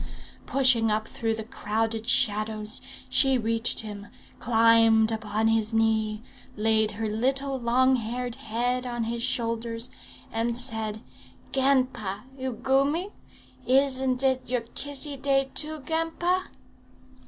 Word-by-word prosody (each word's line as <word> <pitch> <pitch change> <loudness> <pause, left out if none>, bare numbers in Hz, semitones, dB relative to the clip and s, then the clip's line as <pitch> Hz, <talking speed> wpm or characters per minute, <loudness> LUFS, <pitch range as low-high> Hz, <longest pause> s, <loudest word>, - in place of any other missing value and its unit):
Pushing 255 -4 +3
through 220 +1 -1
the 220 - -5
crowded 225 -1 -2
shadows, 215 -1 0 0.3
she 270 -2 +3
reached 230 0 0
him, 205 -2 -8 0.3
climbed 225 -1 +4
upon 220 0 -1
his 225 0 +1
knee, 220 -1 +1 0.3
laid 220 0 +2
her 220 +1 -3
little 265 +5 0
long 255 +2 +3
haired 245 +1 -4
head 245 0 -2
on 240 -1 -2
his 230 +1 -3
shoulders, 230 -1 -1 0.4
and 230 +1 -1
said, 220 -3 -1 0.5
'Ganpa! 255 -7 +1
you 260 -1 -3
goomy? 275 - +1 0.6
Isn't 265 -1 +2
it 260 -2 +1
your 250 -1 0
Kissy 280 +4 -4
Day 270 0 +1
too, 310 0 -2
ganpa?' 330 +5 0
235 Hz, 115 wpm, -26 LUFS, 220-265 Hz, 0.6 s, climbed